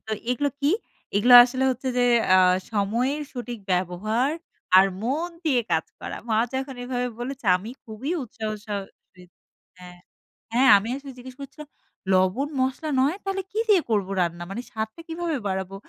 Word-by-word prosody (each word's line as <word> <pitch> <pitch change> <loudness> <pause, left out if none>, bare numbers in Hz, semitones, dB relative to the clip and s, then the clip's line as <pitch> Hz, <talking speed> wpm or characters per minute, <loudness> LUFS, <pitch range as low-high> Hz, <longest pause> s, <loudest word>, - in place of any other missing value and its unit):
তো 220 - -2 0.2
এগুলো 285 +4 +1
কি? 285 +2 +2 0.5
এগুলা 245 +4 +6
আসলে 255 +2 -2
হচ্ছে 260 +1 -3
যে, 245 - +3 0.3
"আ - - +7 0.4
সময়ের 235 +8 0
সঠিক 245 -2 -6
ব্যবহার, 195 +8 0 0.5
আর 190 - +8 0.2
মন 295 +9 -1 0.2
দিয়ে 265 -6 +3
কাজ 160 - +2 0.2
করা।‘’ - - -6
মা 220 - +1 0.2
যখন 265 0 -3
এভাবে 250 0 -2
বলেছে, 265 +1 -6
আমি 210 +6 -8
খুবই 230 +6 -6
উৎসাহ 220 -2 -5 0.2
সহ 205 -1 -2 0.4
রি 180 - -14 0.6
হ্যাঁ। 180 -1 -12 0.6
হ্যাঁ, 260 +2 +5
আমি 200 +3 -4
আসলে 275 0 -8
জিজ্ঞেস 250 0 -11
করছিলাম, 295 +2 -10 0.4
‘’লবণ 190 +9 +2
মশলা 265 +4 -1
নয়! 285 +7 +2
তাহলে 390 0 -2
কি 430 - -2
দিয়ে 390 -5 +6
করব 205 -4 +1
রান্না? 170 0 -2
মানে 230 - -4
স্বাদটা 220 +8 -5
কিভাবে 330 -2 -2
বাড়াবো?‘’ 190 0 -3
245 Hz, 160 wpm, -24 LUFS, 205-275 Hz, 0.6 s, আর